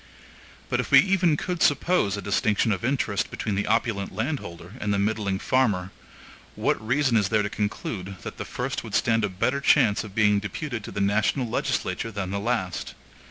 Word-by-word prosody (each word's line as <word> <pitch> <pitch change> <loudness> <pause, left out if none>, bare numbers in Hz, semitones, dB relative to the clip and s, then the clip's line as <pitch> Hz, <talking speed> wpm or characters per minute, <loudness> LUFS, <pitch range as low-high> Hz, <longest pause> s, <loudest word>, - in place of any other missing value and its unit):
But - - -1
if - - -2
we - - +8
even 185 -5 +4
could 180 +1 -3
suppose 145 - +2
a 100 - -6
distinction 105 +3 +1
of 100 - -2
interest 115 -6 0
between 105 - -3
the 100 +1 -1
opulent 110 -2 0
landholder 100 - -4
and 105 - -1
the 100 - +2
middling 100 -1 0
farmer, 100 -6 +1 0.6
what - - 0
reason 130 +2 +2
is 105 -4 +3
there 110 -2 +2
to 105 - -3
conclude, 100 -2 -3
that - - -7
the - - -4
first - - -3
would - - -5
stand 115 -1 +2
a 105 - +1
better 125 +9 -1
chance 105 -7 +4
of 105 -2 -10
being 105 -2 +4
deputed 110 - -5
to - - -7
the 100 - -3
national 105 +6 +1
legislature 115 0 -2
than 100 -3 -4
the 100 - -1
last? 105 -5 -2
105 Hz, 190 wpm, -25 LUFS, 100-125 Hz, 0.6 s, we